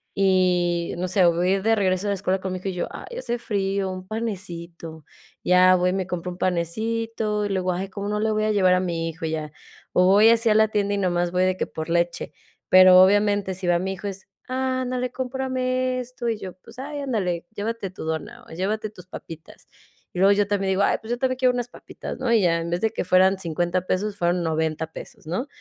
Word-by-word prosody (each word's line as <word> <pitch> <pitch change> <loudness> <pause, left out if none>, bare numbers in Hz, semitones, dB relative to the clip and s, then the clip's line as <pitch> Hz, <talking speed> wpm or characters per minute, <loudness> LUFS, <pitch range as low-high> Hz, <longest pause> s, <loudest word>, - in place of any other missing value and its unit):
y 180 -3 +2
no 180 +1 -2
sé, 185 +1 +2
voy 175 +1 +2
a - - +3
ir 190 - -6
de 225 +1 +3
regreso 190 -1 0
a - - 0
la - - +1
escuela 190 0 -1
con 190 -1 -3
mi - - -3
hijo 185 +2 -4
y - - -4
yo: 180 - -3
"Ay, 485 - -9
hace 240 - -2
frío, 195 -3 -1
un 185 0 -8
panecito". 170 -7 -6 0.4
Ya 185 0 +6
voy, 180 0 +1
me 190 -1 -2
compro 180 -1 -4
un 175 - -9
panecito 215 +4 -1
y - - -2
luego: 185 -2 0
"Ay, 185 +2 -3
¿cómo 200 +1 -5
no 210 0 -1
le 220 +1 +1
voy 215 0 0
a 215 - +1
llevar 190 -3 +4
a 180 - +3
mi 170 -2 -2
hijo?", 165 0 -5
ya, 155 -1 -4 0.4
o 180 - +4
voy 205 +4 +6
así 230 0 +3
a 215 - +4
la 220 0 +4
tienda 205 -1 0
y - - -2
nada 185 -3 0
más 175 0 0
voy 180 +1 +2
de 185 0 +2
que - - -2
por 160 +1 -6
leche. 170 0 -1 0.4
Pero 185 0 +8
obviamente 205 0 +2
si 185 0 -5
va 175 -1 +3
mi 190 +2 -2
hijo 190 +2 -6
es: 195 -1 -7 0.2
"Ándale, 255 -1 -2
cómprame 255 0 -1
esto", 250 -1 -4
y 225 - -1
yo, 185 -3 -7
pues: 185 - -17
"Ay, 290 +2 -5
ándale, 195 -11 -2
llévate 215 -1 -3
tu 190 - -9
dona 160 +10 -5
o - - -15
llévate 205 +6 -2
tus 180 -4 -14
papitas" 160 -3 -11 0.4
y 180 - -6
luego 195 +2 +6
yo 205 0 +1
también 200 -1 0
digo: 190 +1 +1
"Ay, - - +2
pues, 220 - -11
yo 240 - 0
también 255 0 0
quiero 255 -1 +3
unas 245 0 -3
papitas", - - -9
¿no?, 255 -2 -1
y 230 -2 +4
ya 170 -3 +3
en 165 - -4
vez 175 +1 -2
de 220 - +2
que - - -3
fueran 185 +2 +4
50 175 +1 -1
pesos 200 +2 -1
fueron 175 0 +1
90 160 0 -1
pesos, - - -11
¿no?, 185 - -2
190 Hz, 240 wpm, -24 LUFS, 180-220 Hz, 0.4 s, Pero